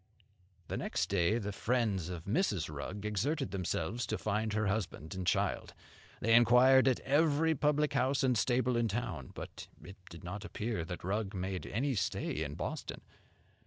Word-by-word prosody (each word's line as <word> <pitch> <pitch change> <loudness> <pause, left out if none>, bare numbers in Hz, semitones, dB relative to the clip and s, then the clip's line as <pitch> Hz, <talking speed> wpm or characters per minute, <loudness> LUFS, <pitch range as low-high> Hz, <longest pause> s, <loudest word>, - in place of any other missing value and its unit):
The - - -3
next - - -1
day 100 +3 +2
the 105 -3 -3
friends 105 -6 0
of 85 -3 -6
Mrs. 100 - 0
Rugg 100 +8 -5
exerted 110 - -1
themselves 95 +4 -2
to - - -1
find 110 +1 -1
her 110 0 +1
husband 95 -5 -2
and 95 -1 -4
child. - - 0 0.5
They 115 - +3
inquired 125 +3 +7
at 130 - +2
every 155 +3 +3
public 150 0 +1
house 135 +1 +2
and 130 -2 +3
stable 125 +2 +2
in 120 -1 +2
town; 95 - -3
but - - -8 0.2
it 95 +5 -11
did 85 -1 -11
not 95 +3 -6
appear 105 -3 -3
that 90 +1 -6
Rugg 100 +2 -2
made 95 0 -3
any 135 +5 0
stay 90 - -1
in 75 -1 -5
Boston. - - -5
110 Hz, 165 wpm, -33 LUFS, 95-130 Hz, 0.5 s, inquired